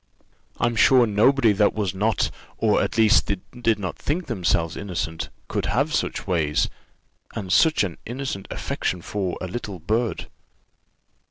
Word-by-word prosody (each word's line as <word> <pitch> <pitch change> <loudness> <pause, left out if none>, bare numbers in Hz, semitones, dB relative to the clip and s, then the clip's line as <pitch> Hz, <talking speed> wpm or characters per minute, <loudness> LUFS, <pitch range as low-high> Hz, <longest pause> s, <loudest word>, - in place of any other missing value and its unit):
I'm 120 0 +1
sure, 125 +2 +6
nobody 115 +3 +4
that 105 0 +2
was 100 -5 -1
not 105 +4 0 0.3
or, - - +2
at - - -2
least, 110 -1 +5
that 100 +5 -5
did 115 -2 +3
not 95 -4 -5
think 165 +5 -2
themselves 85 - 0
innocent, 85 -5 -4 0.2
could - - -2
have 140 - +1
such - - -1
ways, 80 -6 +1 0.7
and 95 -5 -2
such 160 -3 +4
an 90 -5 -4
innocent 120 -5 -5
affection 90 -2 -3
for 95 -4 -3
a 95 - -3
little 100 -1 -5
bird. 110 +7 -1
105 Hz, 150 wpm, -24 LUFS, 90-120 Hz, 0.7 s, sure